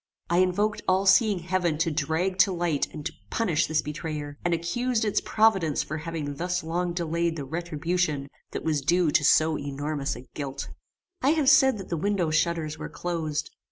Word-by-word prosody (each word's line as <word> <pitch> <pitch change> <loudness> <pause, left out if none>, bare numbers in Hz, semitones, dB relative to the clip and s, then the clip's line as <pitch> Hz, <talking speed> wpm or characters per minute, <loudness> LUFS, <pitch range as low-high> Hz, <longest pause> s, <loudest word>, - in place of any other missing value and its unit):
I 175 - +4
invoked 195 +4 +1
all 190 +1 +3
seeing 195 +1 +5
heaven 175 -2 0
to 165 +1 +1
drag 160 +5 -1
to 195 - +5
light 170 -5 0
and 150 -2 -8
to - - -3 0.2
punish 170 -8 +1
this 155 -1 +1
betrayer, 150 -1 -5
and 175 - +1
accused 220 +8 0
its 210 - +1
providence 195 -9 +2
for 155 +1 -5
having 155 -3 -5
thus 180 +1 -1
long 175 +2 -1
delayed 170 -1 -1
the 145 -4 -5
retribution 165 -1 -2 0.2
that - - -5
was 155 -3 0
due 170 +3 +2
to 150 - +3
so 155 +1 +4
enormous 145 0 -3
a 120 - -9
guilt. 140 -1 -5 0.5
I 280 +4 +4
have 305 -4 +3
said 265 -5 +6
that 195 - -8
the 170 - -1
window 185 -2 0
shutters 155 -1 0
were - - -5
closed. 155 -4 -3
170 Hz, 185 wpm, -26 LUFS, 150-185 Hz, 0.5 s, said